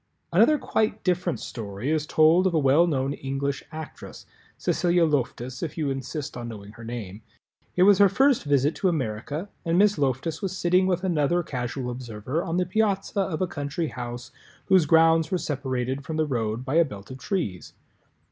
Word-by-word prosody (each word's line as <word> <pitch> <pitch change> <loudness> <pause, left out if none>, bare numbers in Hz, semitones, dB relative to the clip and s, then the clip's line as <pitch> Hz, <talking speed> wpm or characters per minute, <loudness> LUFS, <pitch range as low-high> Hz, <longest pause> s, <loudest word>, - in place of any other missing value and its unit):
Another 305 - +5
quite 220 -5 -1
different 180 -2 0
story 110 +3 -5
is 155 -1 0
told 165 +4 +4
of 175 - 0
a - - +4
well 150 +4 +4
known 135 -3 0
English 135 0 -3
actress—Cecilia 170 +2 -2
Loftus, 130 -4 -2
if 165 -2 -4
you 150 -4 0
insist 135 +2 -5
on 120 -1 -5
knowing 105 -3 -9
her 115 +2 -13
name. 110 -3 -6 0.5
It 180 - +4
was 200 0 +6
her 200 -1 +7
first 265 +6 +3
visit 145 +1 +2
to 190 - +2
America 145 - -3 0.2
and 165 0 +1
Miss 205 -2 +4
Loftus 140 +4 -1
was 190 -1 -3
sitting 180 +2 +3
with 180 0 0
another 175 -1 +1
Casual 125 -2 -4
Observer 120 +4 -4
on 170 -2 -2
the 180 - +2
piazza 200 +1 0
of 185 -2 -1
a - - +2
country 145 +2 -3
house 120 0 -7 0.3
whose 185 -5 +4
grounds 165 0 +5
were 185 - +1
separated 130 -3 -3
from 155 +2 -4
the 155 - +2
road 115 -3 -2
by 140 +4 0
a 170 - +7
belt 105 -7 -9
of 130 - -8
trees. 125 - -3
150 Hz, 180 wpm, -25 LUFS, 130-175 Hz, 0.5 s, her